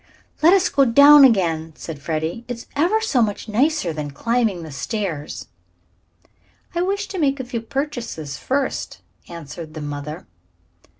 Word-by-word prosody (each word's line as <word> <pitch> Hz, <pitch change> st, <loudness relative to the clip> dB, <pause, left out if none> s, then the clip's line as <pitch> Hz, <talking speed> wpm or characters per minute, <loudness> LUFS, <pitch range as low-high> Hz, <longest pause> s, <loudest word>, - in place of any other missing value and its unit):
"Let 335 Hz, +4 st, +6 dB
us 380 Hz, -2 st, +4 dB
go 275 Hz, -, +3 dB
down 280 Hz, +4 st, +8 dB
again," 165 Hz, -10 st, +3 dB
said 155 Hz, -4 st, -8 dB
Freddie. 160 Hz, +8 st, -3 dB
"It's 245 Hz, -1 st, -6 dB
ever 355 Hz, +10 st, +2 dB
so 300 Hz, -, +1 dB
much 210 Hz, 0 st, -1 dB
nicer 220 Hz, -, +1 dB
than 150 Hz, -1 st, -4 dB
climbing 220 Hz, -, -1 dB
the 160 Hz, -, -9 dB
stairs." 165 Hz, -1 st, -4 dB, 1.3 s
"I 345 Hz, -, 0 dB
wish 400 Hz, +2 st, -1 dB
to 380 Hz, -, -5 dB
make 280 Hz, -3 st, +1 dB
a 260 Hz, -, -4 dB
few 245 Hz, -2 st, -4 dB
purchases 230 Hz, -, -4 dB
first," 270 Hz, +1 st, -3 dB, 0.3 s
answered 165 Hz, -1 st, -9 dB
the 155 Hz, -, -6 dB
mother. 145 Hz, +1 st, -6 dB
230 Hz, 145 wpm, -21 LUFS, -, 1.3 s, down